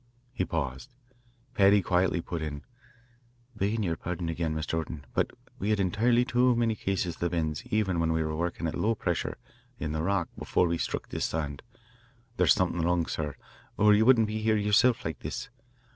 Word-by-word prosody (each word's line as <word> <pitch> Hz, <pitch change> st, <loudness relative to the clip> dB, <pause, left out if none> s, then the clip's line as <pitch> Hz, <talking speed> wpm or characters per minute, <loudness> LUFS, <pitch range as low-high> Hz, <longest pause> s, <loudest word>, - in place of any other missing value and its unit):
He 95 Hz, -, -1 dB
paused. 75 Hz, -, -3 dB, 0.6 s
Paddy 100 Hz, -2 st, +5 dB
quietly 90 Hz, -1 st, +2 dB
put 85 Hz, -1 st, -5 dB
in: 75 Hz, -2 st, -5 dB, 0.9 s
"Beggin' 105 Hz, +2 st, 0 dB
yer 85 Hz, -4 st, 0 dB
pardon 85 Hz, +1 st, -4 dB
again, 80 Hz, -1 st, -2 dB
Mr. 80 Hz, 0 st, -3 dB
Orton, 80 Hz, -3 st, -6 dB
but -, -, +1 dB, 0.3 s
we 100 Hz, -, -1 dB
had 105 Hz, -1 st, +2 dB
entirely 115 Hz, +6 st, +2 dB
too 125 Hz, 0 st, +3 dB
many 115 Hz, -1 st, +2 dB
cases 95 Hz, -4 st, -2 dB
of -, -, -17 dB
the 85 Hz, -, 0 dB
bends 80 Hz, +2 st, -2 dB
even 105 Hz, -7 st, 0 dB
when 80 Hz, 0 st, +1 dB
we 80 Hz, 0 st, +1 dB
were 80 Hz, 0 st, -2 dB
wurkin' 85 Hz, +1 st, -2 dB
at 80 Hz, -, -1 dB
low 115 Hz, +2 st, +1 dB
pressure, 90 Hz, -5 st, -2 dB, 0.4 s
in 75 Hz, -, -3 dB
the 80 Hz, 0 st, -2 dB
rock, 95 Hz, 0 st, 0 dB
before 90 Hz, -, +2 dB
we 85 Hz, 0 st, -1 dB
sthruck -, -, -3 dB
this -, -, -2 dB
sand. 75 Hz, -2 st, -3 dB, 0.8 s
There's -, -, +5 dB
somethin' 90 Hz, -4 st, 0 dB
wrong, 85 Hz, 0 st, +1 dB
sir, 75 Hz, -3 st, -3 dB, 0.4 s
or 105 Hz, 0 st, +6 dB
ye 105 Hz, -, +4 dB
wouldn't 115 Hz, -1 st, +6 dB
be 110 Hz, +1 st, -3 dB
here 110 Hz, 0 st, +2 dB
yerself 115 Hz, +4 st, +3 dB
like 80 Hz, -5 st, -3 dB
this. -, -, -5 dB
90 Hz, 190 wpm, -28 LUFS, 80-105 Hz, 0.9 s, or